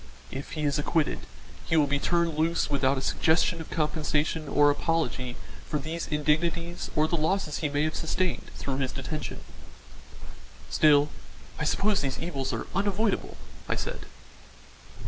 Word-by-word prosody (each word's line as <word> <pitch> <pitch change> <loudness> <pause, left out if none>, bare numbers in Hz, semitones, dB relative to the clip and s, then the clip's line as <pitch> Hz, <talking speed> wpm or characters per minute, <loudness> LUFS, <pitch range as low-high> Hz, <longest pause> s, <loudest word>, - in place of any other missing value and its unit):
If 135 +1 -6
he 155 - -3
is 145 0 +1
acquitted, 155 +1 0 0.4
he 160 - +3
will 150 - +6
be 145 0 0
turned 170 0 +1
loose 160 0 +1
without 135 -1 +2
a 130 - -3
suggestion 165 +1 +2
of 160 - -9
compensation 155 0 0
or 145 +1 +5
apology 145 -5 -1 0.3
for 150 - 0
these 160 +3 -4
indignities 165 +3 0
or 155 +1 +4
the 170 - 0
losses 160 -1 0
he 150 - 0
may 145 +1 +1
have 155 0 0
sustained 175 +2 -1
through 135 -1 -3
his 135 -2 -1
detention." 140 -2 -4 1.3
"Still 150 -1 +5 0.5
I - - 0
suppose 205 0 +2
these 135 -2 -1
evils 145 -6 -3
are - - -3
unavoidable," 205 +1 0 0.3
I - - +2
said. - - -4
155 Hz, 150 wpm, -28 LUFS, 145-170 Hz, 1.3 s, will